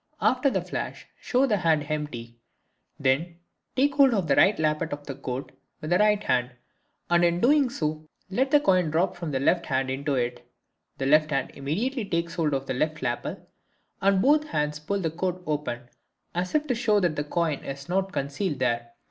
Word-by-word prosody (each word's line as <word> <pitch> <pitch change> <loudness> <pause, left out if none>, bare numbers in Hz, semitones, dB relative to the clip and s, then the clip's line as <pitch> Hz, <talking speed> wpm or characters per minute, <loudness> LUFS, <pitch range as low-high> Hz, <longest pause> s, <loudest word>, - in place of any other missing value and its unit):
After 255 +2 +3
the - - -1
flash - - -5
show 255 +2 +2
the 215 -6 +1
hand 160 -4 +2
empty, 120 -6 -5 0.6
then 145 +6 +1 0.4
take 280 +2 +3
hold 275 -4 +5
of 195 -4 0
the 140 - +3
right 205 - +5
lappet 155 +1 0
of 145 0 -6
the 140 - -5
coat 130 0 -5 0.3
with 155 -1 -6
the 180 - +4
right 210 0 +3
hand, 125 0 0 0.6
and 175 0 +4
in 170 0 +3
doing 275 +4 +4
so 155 -6 -3 0.2
let 250 +8 0
the 295 - +6
coin 185 - +2
drop 170 +5 +1
from 175 -2 -5
the 135 -2 -1
left 170 +6 +2
hand 130 -1 0
into 140 +1 -1
it. 120 -1 -2 0.5
The 135 - -2
left 155 +2 +4
hand 135 -3 -1
immediately 210 - -2
takes 170 -2 -2
hold 155 -5 0
of 135 0 -3
the 130 - -2
left 150 +3 -1
lapel, 120 -1 -3 0.6
and 195 0 +3
both 300 +2 +4
hands 150 - -1
pull 200 +7 -2
the 160 -3 -1
coat 180 +2 -3
open 145 -5 -3 0.5
as 180 - -2
if 305 0 +2
to 270 - 0
show 225 -3 +2
that 175 -5 +1
the 145 - -1
coin 155 -1 -1
is 135 +1 -7
not 190 +2 0
concealed 140 +3 -2
there. 120 -2 -1
160 Hz, 200 wpm, -26 LUFS, 140-195 Hz, 0.6 s, the